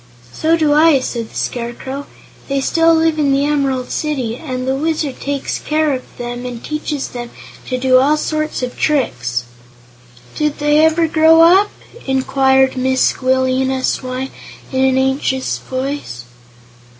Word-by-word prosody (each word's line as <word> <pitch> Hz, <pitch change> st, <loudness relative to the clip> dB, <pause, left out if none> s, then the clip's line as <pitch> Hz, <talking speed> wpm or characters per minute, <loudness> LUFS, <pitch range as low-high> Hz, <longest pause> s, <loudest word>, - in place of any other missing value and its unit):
"So 325 Hz, +1 st, +1 dB
do 305 Hz, -2 st, +2 dB
I," 305 Hz, -1 st, +5 dB
said 235 Hz, -3 st, -4 dB
the -, -, -18 dB
Scarecrow. 255 Hz, +3 st, -4 dB, 0.4 s
"They 275 Hz, 0 st, 0 dB
still 330 Hz, +4 st, +3 dB
live 320 Hz, -1 st, +1 dB
in 285 Hz, -2 st, +2 dB
the 275 Hz, +1 st, +2 dB
Emerald 275 Hz, -4 st, -1 dB
City, 265 Hz, -7 st, -2 dB
and 255 Hz, 0 st, -5 dB
the 265 Hz, -, +1 dB
Wizard 300 Hz, -1 st, -2 dB
takes 280 Hz, -1 st, -3 dB
good -, -, -14 dB
care 305 Hz, -1 st, +2 dB
of 255 Hz, -, -7 dB
them 245 Hz, 0 st, -5 dB
and 245 Hz, -2 st, -7 dB
teaches 300 Hz, -2 st, -3 dB
them 240 Hz, -1 st, -7 dB, 0.4 s
to 255 Hz, -, -2 dB
do 255 Hz, 0 st, +4 dB
all 290 Hz, +4 st, +3 dB
sorts 310 Hz, -3 st, -2 dB
of 250 Hz, -, -4 dB
tricks." 125 Hz, -, -1 dB, 0.9 s
"Did 300 Hz, -1 st, -1 dB
they 295 Hz, +1 st, +3 dB
ever 320 Hz, +1 st, +3 dB
grow 320 Hz, +1 st, +5 dB
up?" 380 Hz, +5 st, +5 dB, 0.4 s
inquired 265 Hz, 0 st, +2 dB
Mrs. 260 Hz, 0 st, +1 dB
Squealina 260 Hz, 0 st, 0 dB
Swyne, 255 Hz, +1 st, -2 dB, 0.4 s
in 260 Hz, 0 st, +1 dB
an 260 Hz, 0 st, +2 dB
anxious 265 Hz, 0 st, 0 dB
voice. 260 Hz, -, -5 dB
270 Hz, 150 wpm, -17 LUFS, 255-305 Hz, 0.9 s, I